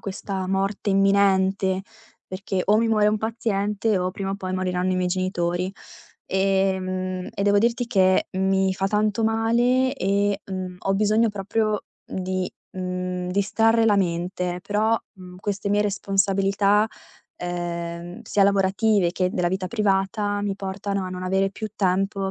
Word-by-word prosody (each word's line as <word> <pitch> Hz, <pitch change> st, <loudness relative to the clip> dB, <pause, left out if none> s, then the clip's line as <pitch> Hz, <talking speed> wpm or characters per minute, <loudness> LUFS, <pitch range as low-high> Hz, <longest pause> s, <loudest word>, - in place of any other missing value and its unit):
questa 195 Hz, -1 st, -4 dB
morte 195 Hz, +1 st, -1 dB
imminente, 195 Hz, -1 st, +3 dB, 0.4 s
perché 185 Hz, 0 st, -3 dB
o 210 Hz, +1 st, +4 dB
mi 230 Hz, -, +2 dB
muore 210 Hz, -1 st, +4 dB
un 215 Hz, 0 st, +1 dB
paziente 210 Hz, -2 st, 0 dB
o 180 Hz, 0 st, -1 dB
prima 195 Hz, -2 st, -4 dB
o 195 Hz, -, -2 dB
poi 185 Hz, -1 st, -5 dB
moriranno 185 Hz, 0 st, 0 dB
i -, -, 0 dB
miei 180 Hz, 0 st, 0 dB
genitori. 180 Hz, 0 st, -1 dB, 0.5 s
Ehm, 185 Hz, -1 st, 0 dB
e 200 Hz, -, -2 dB
devo 205 Hz, 0 st, +4 dB
dirti 235 Hz, +2 st, +1 dB
che 190 Hz, -4 st, +3 dB
mi 190 Hz, 0 st, +2 dB
fa 195 Hz, 0 st, -1 dB
tanto 210 Hz, +2 st, +1 dB
male 240 Hz, +4 st, +2 dB
e, 200 Hz, -3 st, 0 dB
mhmm, 185 Hz, -1 st, -5 dB
ho 195 Hz, -, 0 dB
bisogno 215 Hz, +3 st, +3 dB
proprio 210 Hz, +1 st, -1 dB, 0.2 s
di, 185 Hz, 0 st, -3 dB, 0.3 s
mhmm, 180 Hz, 0 st, -3 dB
distrarre 225 Hz, +4 st, +2 dB
la 205 Hz, -2 st, +4 dB
mente. 180 Hz, 0 st, -1 dB
Però, 215 Hz, +3 st, +1 dB, 0.2 s
mhmm, 180 Hz, -1 st, -12 dB
queste 200 Hz, 0 st, -3 dB
mie 205 Hz, 0 st, +3 dB
responsabilità, 195 Hz, +1 st, +2 dB, 0.5 s
ehm, 175 Hz, +1 st, -5 dB
sia 205 Hz, -2 st, +2 dB
lavorative 200 Hz, -1 st, +2 dB
che 185 Hz, -1 st, 0 dB
della 175 Hz, -2 st, 0 dB
vita 190 Hz, 0 st, -2 dB
privata, 205 Hz, -1 st, 0 dB
mi 200 Hz, -1 st, -1 dB
portano 195 Hz, 0 st, -3 dB
a -, -, -4 dB
non 185 Hz, 0 st, -6 dB
avere 190 Hz, +1 st, +1 dB
più 215 Hz, +2 st, -6 dB
tempo 195 Hz, +1 st, 0 dB
195 Hz, 150 wpm, -24 LUFS, 185-205 Hz, 0.5 s, o